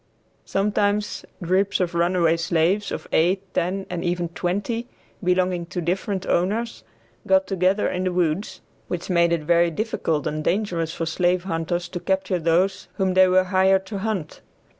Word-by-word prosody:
Sometimes 205 +1 0 0.2
groups 190 +3 +1
of 180 -2 0
runaway 170 -1 +2
slaves, 170 +4 +1
of - - -5
eight, 185 +4 +1
ten 190 +3 -1
and 175 -1 -4
even 175 -1 -1
twenty, 205 +8 -2 0.4
belonging 180 -1 +1
to 180 - -4
different 185 +3 -2
owners, 215 +7 -1 0.4
got 285 0 +4
together 190 +1 +1
in 185 0 -2
the 185 - +1
woods, 175 +1 -1 0.3
which 180 +1 -4
made 170 -1 +3
it 170 -2 0
very 170 +2 +3
difficult 165 -5 -2
and 155 0 -2
dangerous 170 -3 0
for 165 - -3
slave 175 +2 +1
hunters 175 0 -2
to 175 - -5
capture 190 0 0
those 170 +4 +1
whom 190 -2 +1
they 185 0 +6
were 185 0 +4
hired 190 +1 +3
to 200 0 -5
hunt. 195 -6 -3
180 Hz, 160 wpm, -23 LUFS, 170-195 Hz, 0.4 s, they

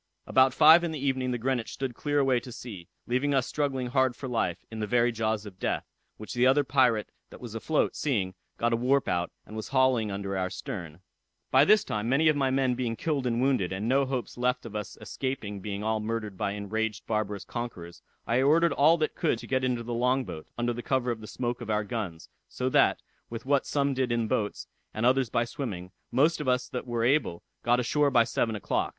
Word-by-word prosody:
About 130 0 +4
five 160 +5 +7
in 170 - -1
the 155 - -4
evening 130 -2 -1
the 125 - -1
Greenwich 120 -1 -1
stood 135 -2 -4
clear 145 +4 -2
away 135 -3 +3
to 125 - -10
sea, 100 -8 -9 0.2
leaving 135 +4 +1
us 130 -2 +2
struggling 135 -3 -1
hard 130 0 +1
for 135 - -6
life, 115 -8 -1
in 110 - -6
the 105 - -2
very 120 +1 +3
jaws 110 -1 -1
of 95 -2 -11
death; - - -1 0.3
which 110 - -7
the 125 +1 +3
other 140 +2 +4
pirate 125 -5 +2 0.2
that - - -12
was 120 -3 -8
afloat, 145 +7 0
seeing, 105 -11 -1 0.2
got 120 0 +1
a - - +4
warp 130 +4 +2
out, 85 0 0 0.2
and 110 - -10
was 110 - -5
hauling 130 -5 +2
under 100 0 -3
our 95 -1 -1
stern. 85 -3 -7 0.5
"By - - +6
this 210 0 +5
time 105 +2 -2
many 155 +4 +4
of 155 - +3
my 135 -2 +1
men 130 -1 +2
being 120 -2 -2
killed 140 -1 -1
and 120 -1 0
wounded, 130 -10 +1
and 95 +4 -3
no 135 +2 +3
hopes 130 -2 -4
left 125 0 0
us 105 -3 -5
of - - -21
escaping 120 -7 -4
being 100 +1 -5
all 110 0 0
murdered 110 -2 -3
by 100 +1 -2
enraged 105 +1 -3
barbarous 105 -3 -2
conquerors, 90 -8 -6 0.2
I 115 +5 +2
ordered 165 +5 +4
all 160 +4 +5
that 155 -1 -1
could 155 -8 0
to - - -9
get 130 -1 0
into 125 -2 0
the 120 +1 -4
long 125 +2 +1
boat, 80 -6 -8
under 120 0 0
the 120 - -5
cover 125 -1 0
of 110 -2 -5
the 110 - -9
smoke 120 +1 -3
of 115 - -7
our 105 0 +1
guns; 100 -7 -5 0.2
so 130 0 -2
that, - - +3 0.3
with 115 +1 -7
what 140 0 +2
some 140 -1 +1
did 130 -2 0
in 115 -1 0
boats, 105 -1 -2 0.3
and 110 +2 0
others 130 -1 +3
by 115 - +1
swimming, 100 -8 -6 0.2
most 150 +4 +3
of 150 - -5
us 125 0 +1
that 125 +1 -5
were 120 -1 -1
able, 125 - +1 0.2
got 120 +1 +2
ashore 145 +4 +2
by 120 -4 +5
seven 115 -1 -1
o'clock. 105 - -1
120 Hz, 230 wpm, -28 LUFS, 110-130 Hz, 0.5 s, five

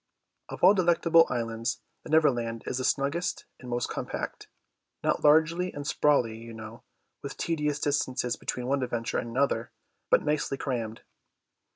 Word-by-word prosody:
Of - - -8
all 185 +3 +9
delectable 170 -3 +4
islands 115 -1 -2 0.2
the - - -12
Neverland 120 -8 +2
is 130 - -2
the - - -2
snuggest 150 +7 -1
and 125 - -10
most 120 0 -1
compact, - - -5 0.6
not - - 0
large 155 +2 +6
and 170 -4 -4
sprawly, 140 -7 +2
you 115 0 -10
know, 110 +1 -9 0.4
with 140 -1 -7
tedious 150 -3 -1
distances 130 -4 0
between 125 - -4
one 135 +2 0
adventure 120 -2 -2
and 120 - -5
another, 120 -2 0 0.4
but - - +4
nicely 150 -2 0
crammed. 115 -5 -3
135 Hz, 150 wpm, -28 LUFS, 115-150 Hz, 0.6 s, all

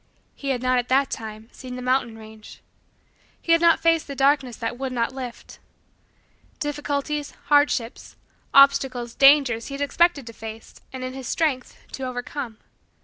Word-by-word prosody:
He 280 - -6
had 255 -2 -1
not, 255 0 +2
at 245 - -4
that 270 +1 +2
time, 220 0 -7
seen 255 -2 -9
the 250 - -6
mountain 250 -3 0
range. 220 -1 -13 0.8
He 335 - -2
had 335 0 +5
not 335 -1 +5
faced 330 -1 +2
the 280 - -6
darkness 270 -2 +2
that 230 +2 -4
would 265 -1 -3
not 240 0 -1
lift. 250 -3 -8 1.0
Difficulties, 295 0 -3
hardships, 290 -5 +1 0.4
obstacles, 270 -4 +4
dangers, 275 -5 +4
he 275 - -6
had 280 - -6
expected 290 0 +2
to 230 - -9
face, 220 0 -10
and, 260 -1 -7
in 255 0 -5
his 265 -2 -7
strength, 285 -6 -1
to - - -8
overcome. 250 -1 -5
260 Hz, 160 wpm, -23 LUFS, 240-285 Hz, 1.0 s, had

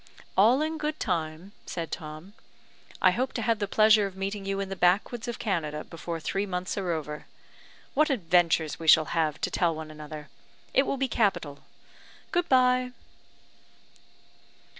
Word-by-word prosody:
"All 235 +9 +5
in 315 0 -3
good 305 0 -3
time," 170 -1 -3 0.2
said 165 -2 -4
Tom. 155 +5 -7 0.7
"I 185 - +7
hope 255 +8 -1
to 235 - -2
have 230 -1 +1
the 205 - -1
pleasure 215 0 +5
of 190 - -11
meeting 195 +1 -4
you 195 0 -1
in 195 -1 -3
the 195 - -4
backwoods 195 +7 +1
of 240 - -4
Canada 155 -8 -2
before 165 0 -6
three 195 +6 -2
months 180 0 -3
are 190 -3 -3
over. 150 -2 -5 0.7
What 305 +2 +3
adventures 170 - +2
we 165 - -6
shall 155 0 +7
have 155 -3 0
to - - -1
tell 170 -3 +1
one 155 0 -7
another! 150 -1 -9 0.4
It 270 - +3
will 275 - -1
be 265 0 0
capital. 175 - 0 0.7
Good 350 -1 0
bye." 255 -1 +3
190 Hz, 160 wpm, -27 LUFS, 160-230 Hz, 0.7 s, I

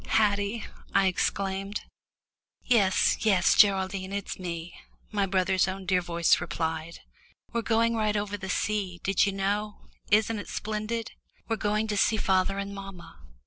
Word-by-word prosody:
"Haddie," 205 +1 +1 0.3
I 195 0 +5
exclaimed. 195 +2 -1 0.8
"Yes, 205 -6 +3
yes, 195 -5 +4
Geraldine, 190 -1 +3
it's 200 -1 -4
me," 170 -1 -5 0.4
my 200 -2 +1
brother's 185 0 +2
own 190 0 -5
dear 185 -1 +2
voice 170 -2 +2
replied. 160 -1 -3 0.5
"We're 235 - 0
going 230 0 +2
right 215 -1 +1
over 205 0 -2
the 190 -2 -7
sea 190 -2 -1
did 195 0 +3
you - - +1
know? 205 +2 -2 0.3
isn't 215 +1 +3
it - - -8
splendid? 215 +2 -3 0.4
We're 225 - -1
going 210 +1 0
to 210 -1 -2
see 220 +2 +3
father 190 -1 +1
and 200 0 -4
mamma. 195 - -10
195 Hz, 145 wpm, -27 LUFS, 185-210 Hz, 0.8 s, I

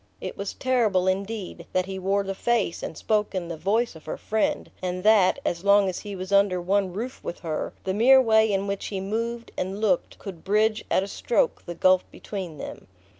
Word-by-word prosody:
It - - -6
was 200 - -5
terrible, 225 -8 +2
indeed, 195 +1 -3
that 185 0 +2
he 190 0 -5
wore 195 +2 +1
the 195 0 -3
face 215 -4 0
and 160 - -6
spoke 210 -2 0
in 175 -2 -3
the 170 - -3
voice 205 +9 0
of 160 - -13
her - - -4
friend, 220 0 -1
and 180 0 -3
that, 210 -2 +5
as 170 - -1
long 200 0 +5
as 185 - -2
he 205 -2 -7
was 185 +1 -6
under 200 -2 +4
one 190 +1 +1
roof 235 +8 -6
with - - -6
her, 160 -3 -3
the 190 - -1
mere 255 +6 +7
way 220 -3 +4
in 195 0 0
which 200 0 -3
he 195 - -3
moved 230 +4 -3
and 190 +2 -3
looked 200 -5 0
could 185 -6 -9
bridge 215 +2 +2
at 190 - +2
a - - -5
stroke 485 - 0
the 175 - -5
gulf 185 +2 +4
between 185 -7 -7
them. - - -8
200 Hz, 215 wpm, -25 LUFS, 185-220 Hz, -, mere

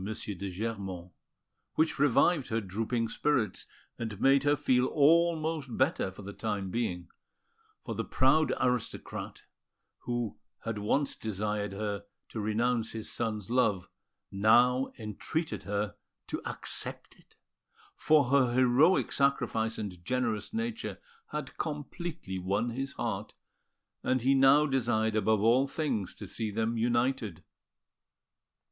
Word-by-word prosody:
de 100 -2 -4
Germont, 95 -3 -5 0.6
which 160 -2 +1
revived 145 +2 +3
her 115 - 0
drooping 115 +4 -2
spirits, 115 -4 0 0.3
and 110 -4 -4
made 135 +2 +5
her 145 0 +4
feel 130 -3 +2
almost 160 -3 +2
better 130 - +2
for 95 +2 -11
the 100 +1 -7
time 100 -4 -3
being; 90 -7 -2 0.8
for - - -3
the - - -2
proud 145 +4 +3
aristocrat, 125 -2 -2 0.6
who 120 -4 -3 0.2
had 115 -2 -3
once 135 +7 +1
desired 105 -1 -2
her 100 0 -3 0.2
to 110 - -6
renounce 115 +2 0
his 110 -1 -4
son's 110 -3 -3
love, 110 -8 +2 0.4
now 120 +6 +4
entreated 110 - -3
her 105 +1 -2 0.3
to - - -4
accept - - -2
it, - - -24 0.6
for 145 -5 +3
her 130 -4 +4
heroic 130 +8 +4
sacrifice 120 -5 +1
and 90 -5 -6
generous 115 -2 -1
nature 230 +1 -3 0.3
had - - -5
completely 150 - -4
won 100 +6 0
his 135 +3 -4
heart, 110 -4 -4 0.7
and 130 -1 +1
he 135 +2 +4
now 135 +2 +6
desired 120 -5 +1
above 110 0 +2
all 120 +5 +4
things 135 - -2
to - - -8
see 110 -1 -3
them 110 +2 -1
united. 120 -5 0
115 Hz, 125 wpm, -30 LUFS, 105-135 Hz, 0.8 s, now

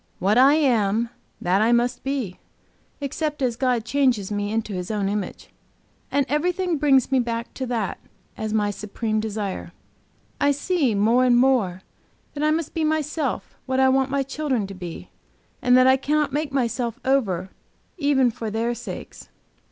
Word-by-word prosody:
What 200 +3 +2
I 270 +4 +6
am, 230 -6 +2 0.3
that 185 +3 +2
I 225 +2 +3
must 240 +1 +1
be, 265 -9 -3 0.6
except 295 +2 -3
as 245 -2 +1
God 245 -2 0
changes 240 -6 +1
me 205 0 -2
into 220 -1 -2
His 180 -1 -4
own 210 -3 -1
image. 200 -2 -4 0.6
And 280 -1 +2
everything 350 +4 0
brings 275 -3 +3
me 265 - +4
back 235 -1 -3
to 260 - -4
that, 230 -5 -2 0.4
as 220 0 -4
my 210 -1 +1
supreme 215 +2 -3
desire. 210 -2 -4 0.7
I 285 0 +3
see 285 - 0
more 225 +5 +3
and 245 -1 +4
more 230 -8 +2 0.5
that 290 - -5
I 305 - +3
must 315 0 -1
be 325 - -1
myself 310 -2 -1
what 260 0 0
I 265 0 +5
want 265 0 +2
my 275 0 0
children 270 -5 -2
to 195 - -8
be, 175 -3 -8 0.5
and 250 0 +5
that 255 - +6
I 260 0 +6
cannot 295 +1 0
make 295 0 -1
myself 245 -2 -1
over 195 -9 +1 0.5
even 275 -4 +3
for 225 0 -5
their 225 +3 -1
sakes. - - -8
250 Hz, 165 wpm, -23 LUFS, 215-280 Hz, 0.7 s, I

